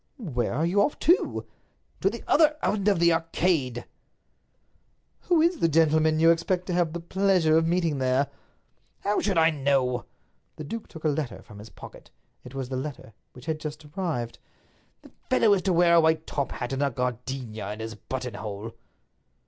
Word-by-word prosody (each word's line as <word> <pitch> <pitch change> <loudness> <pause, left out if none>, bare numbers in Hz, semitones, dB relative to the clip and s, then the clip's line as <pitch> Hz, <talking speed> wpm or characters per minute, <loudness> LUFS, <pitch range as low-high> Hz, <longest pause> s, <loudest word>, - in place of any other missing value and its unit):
"Where 130 - -2
are 155 +4 +1
you 190 +4 +2
off 285 - +1
to?" 350 +3 +2 0.5
"To 195 - +2
the 235 +3 -7
other 305 -1 +4
end 205 -1 0
of 205 - +4
the 170 0 +4
Arcade." 165 -6 0 1.4
"Who 335 -3 +5
is 340 -1 +2
the - - +3
gentleman 155 0 +3
you 165 +1 +6
expect 175 +2 0
to 180 - -3
have 175 -2 +1
the 170 - -3
pleasure 180 -2 +2
of 165 0 +3
meeting 165 -4 +1
there?" 130 +2 +2 0.7
"How 205 +1 0
should 195 -4 0
I 165 0 +5
know?" 135 -4 0 0.5
The 155 - -7
duke 225 +9 -6
took 160 - -12
a - - +2
letter 145 -4 -3
from 105 -3 -13
his 105 +2 -11
pocket—it 120 - -15
was 130 -2 -4
the 130 - -3
letter 130 -5 -6 0.2
which 125 - -13
had 160 -1 -2
just 155 0 -7
arrived. 150 -8 -4 0.6
"The - - -16 0.2
fellow 215 -2 +4
is 195 - +2
to 190 - 0
wear 170 0 +4
a 170 - +7
white 160 0 +2
top 140 -2 -2
hat, 125 +1 -4
and 135 - -2
a 140 - +2
gardenia 125 -4 -4
in 105 - -7
his 110 0 -5
buttonhole." 110 -2 -6
155 Hz, 180 wpm, -26 LUFS, 130-175 Hz, 1.4 s, a